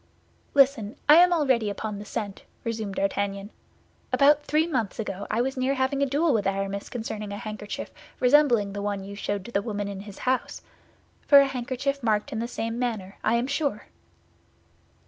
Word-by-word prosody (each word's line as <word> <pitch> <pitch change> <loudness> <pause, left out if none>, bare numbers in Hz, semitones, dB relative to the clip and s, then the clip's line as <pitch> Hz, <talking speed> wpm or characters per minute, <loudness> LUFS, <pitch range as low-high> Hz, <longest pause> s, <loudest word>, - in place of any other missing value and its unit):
"Listen; 265 -6 +3
I 300 +2 +9
am 355 +1 +7
already 265 -10 +2
upon 205 0 -4
the 205 - -8
scent," 205 -2 -5 0.2
resumed 220 -4 -3
D'Artagnan. 200 +1 -2 0.6
"About 290 +1 +5
three 305 +2 +1
months 250 - -2
ago 205 -3 -4
I 220 +2 +1
was 265 +2 -1
near 260 +1 0
having 265 +1 0
a 280 - +3
duel 295 +3 +2
with 205 -4 +1
Aramis 195 0 -2
concerning 220 -4 -5
a 200 - -4
handkerchief 215 -2 -6 0.3
resembling 250 -7 +4
the 205 - -4
one 200 -1 -2
you 200 +1 -8
showed 200 -1 -3
to 235 - -8
the 200 - +1
woman 205 -2 -3
in 200 -1 -6
his 200 0 -10
house—for 260 +2 -1
a 280 - +5
handkerchief 270 +1 -2
marked 220 +3 0
in 220 - -2
the 235 - -2
same 230 0 -4
manner, 215 -6 -3
I 225 - +2
am 235 +1 +1
sure." 280 -5 -2
225 Hz, 180 wpm, -26 LUFS, 205-270 Hz, 0.6 s, I